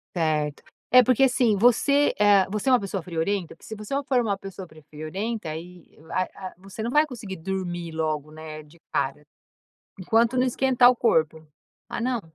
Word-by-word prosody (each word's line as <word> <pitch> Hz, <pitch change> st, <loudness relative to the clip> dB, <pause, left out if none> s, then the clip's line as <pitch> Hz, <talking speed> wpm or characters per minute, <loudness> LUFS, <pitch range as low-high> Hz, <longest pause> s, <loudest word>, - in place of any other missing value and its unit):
Certo. 155 Hz, -3 st, -1 dB, 0.3 s
É, 250 Hz, 0 st, +8 dB
porque, 255 Hz, +2 st, +3 dB
assim, 245 Hz, -5 st, +3 dB
você, 265 Hz, +6 st, +3 dB
eh, 200 Hz, -2 st, +5 dB
você 210 Hz, +5 st, -4 dB
é -, -, +4 dB
uma 250 Hz, -, +5 dB
pessoa 195 Hz, -2 st, -4 dB
friorenta? 170 Hz, +1 st, -2 dB
Porque -, -, -25 dB
se 220 Hz, -, -6 dB
você 210 Hz, +5 st, -7 dB
for 255 Hz, -2 st, +3 dB
uma 200 Hz, -4 st, -1 dB
pessoa 195 Hz, -2 st, -9 dB, 0.2 s
friorenta 185 Hz, +6 st, -4 dB
e -, -, -3 dB
aí, 170 Hz, +2 st, -10 dB
ah 185 Hz, -, 0 dB
ah, 185 Hz, -1 st, -8 dB
você 195 Hz, +3 st, -9 dB
não 230 Hz, -, -2 dB
vai 300 Hz, +5 st, +4 dB
conseguir 210 Hz, -9 st, -8 dB
dormir 175 Hz, -1 st, -4 dB
logo, 155 Hz, -2 st, -2 dB
né, 155 Hz, 0 st, -9 dB
de 150 Hz, +3 st, -20 dB
cara, 140 Hz, +2 st, -1 dB, 0.8 s
enquanto 225 Hz, +6 st, +2 dB
não 255 Hz, -, +3 dB
esquentar 250 Hz, 0 st, +4 dB
o 250 Hz, -, -1 dB
corpo. 160 Hz, -9 st, +1 dB, 0.4 s
Ah, -, -, -4 dB
não. 245 Hz, -2 st, 0 dB
195 Hz, 185 wpm, -25 LUFS, 160-235 Hz, 0.8 s, É